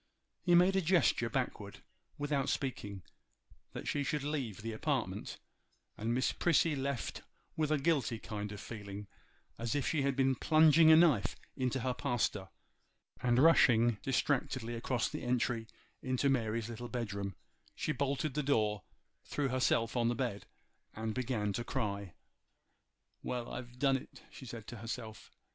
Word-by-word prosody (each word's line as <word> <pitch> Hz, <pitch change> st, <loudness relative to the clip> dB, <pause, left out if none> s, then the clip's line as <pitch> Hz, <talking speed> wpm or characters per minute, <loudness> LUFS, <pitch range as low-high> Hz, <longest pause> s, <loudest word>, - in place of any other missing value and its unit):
He 175 Hz, -2 st, +4 dB
made 180 Hz, +2 st, +5 dB
a 190 Hz, -, +3 dB
gesture 165 Hz, -9 st, +3 dB
backward, 120 Hz, -6 st, -3 dB, 0.3 s
without 145 Hz, -2 st, 0 dB
speaking, 100 Hz, -8 st, -3 dB, 0.7 s
that -, -, -6 dB
she 145 Hz, -, 0 dB
should 140 Hz, +2 st, -1 dB
leave 135 Hz, -9 st, -3 dB
the 115 Hz, -, -3 dB
apartment; 110 Hz, -, -2 dB, 0.6 s
and 110 Hz, +2 st, -2 dB
Miss 130 Hz, +2 st, +2 dB
Prissy 165 Hz, -2 st, +2 dB
left 135 Hz, -2 st, -3 dB, 0.3 s
with 155 Hz, -2 st, 0 dB
a 155 Hz, -, +4 dB
guilty 135 Hz, -5 st, +1 dB
kind 105 Hz, -1 st, -5 dB
of 105 Hz, -, -7 dB
feeling, 100 Hz, -2 st, -7 dB, 0.5 s
as 115 Hz, +3 st, -1 dB
if 145 Hz, -, 0 dB
she 155 Hz, -, +1 dB
had 140 Hz, -1 st, +1 dB
been 135 Hz, 0 st, +3 dB
plunging 155 Hz, +3 st, +6 dB
a -, -, +10 dB
knife 155 Hz, -, +4 dB, 0.2 s
in 130 Hz, -2 st, 0 dB
her 130 Hz, 0 st, -1 dB
pastor; 105 Hz, -6 st, -1 dB, 0.7 s
and 120 Hz, -1 st, +2 dB
rushing 120 Hz, -7 st, +5 dB
distractedly 130 Hz, -3 st, 0 dB
across 120 Hz, +1 st, -1 dB
the 150 Hz, -, -5 dB
entry 120 Hz, -2 st, 0 dB, 0.3 s
into 130 Hz, +2 st, +1 dB
Mary's 115 Hz, -3 st, 0 dB
little 120 Hz, +1 st, -6 dB
bedroom, 100 Hz, -5 st, -3 dB, 0.4 s
she -, -, -1 dB
bolted 140 Hz, +1 st, -1 dB
the 150 Hz, -, 0 dB
door, 110 Hz, -7 st, +1 dB, 0.4 s
threw 140 Hz, -2 st, -1 dB
herself 125 Hz, -2 st, +1 dB
on 120 Hz, -1 st, +2 dB
the 120 Hz, -, +1 dB
bed, 115 Hz, -5 st, -3 dB, 0.5 s
and 110 Hz, 0 st, -3 dB
began 115 Hz, -5 st, -1 dB
to 120 Hz, -, -2 dB
cry. 100 Hz, -7 st, -3 dB, 1.1 s
'Well! 120 Hz, -1 st, -4 dB
I've 120 Hz, 0 st, -7 dB
done 135 Hz, 0 st, +3 dB
it,' -, -, -13 dB
she 130 Hz, -, -10 dB
said 115 Hz, -2 st, -7 dB
to 120 Hz, -, -7 dB
herself. 110 Hz, 0 st, -7 dB
125 Hz, 155 wpm, -33 LUFS, 110-140 Hz, 1.1 s, a